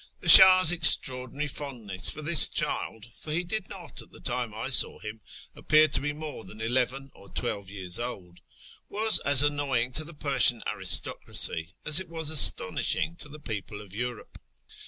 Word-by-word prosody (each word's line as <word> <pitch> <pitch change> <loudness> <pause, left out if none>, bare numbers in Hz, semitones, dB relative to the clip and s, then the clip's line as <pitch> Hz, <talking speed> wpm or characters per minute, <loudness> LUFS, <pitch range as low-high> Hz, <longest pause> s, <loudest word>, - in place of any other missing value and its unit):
The - - -2
Shah's 185 -2 +8
extraordinary 140 -4 +2
fondness 120 -10 -3
for 155 - -5
this 155 -1 +3
child 110 -1 -5
(for 155 - -10
he 170 +3 -2
did 190 +3 -6
not, 170 -8 -10
at 115 - -18
the - - -19
time 125 -2 -6
I 110 +5 -9
saw 135 - +2
him, 110 +1 -12 0.3
appear 155 0 +1
to 140 - -3
be 145 +1 -5
more 150 -5 -11
than 105 +3 -15
eleven 130 +4 -5
or 100 - -20
twelve 100 -2 -7
years 95 -2 -6
old) 95 -8 -11 0.5
was 220 +2 +1
as 140 -1 +3
annoying 140 -4 -4
to 155 - -3
the 160 +1 -12
Persian 135 -5 +3
aristocracy 80 +2 0
as 150 +2 +6
it 190 -3 -10
was 160 -2 -4
astonishing 155 - +2
to 150 - -9
the 150 +1 -14
people 105 -5 -10
of 100 -3 -16
Europe. 120 +2 -9
135 Hz, 175 wpm, -24 LUFS, 110-155 Hz, 0.5 s, Shah's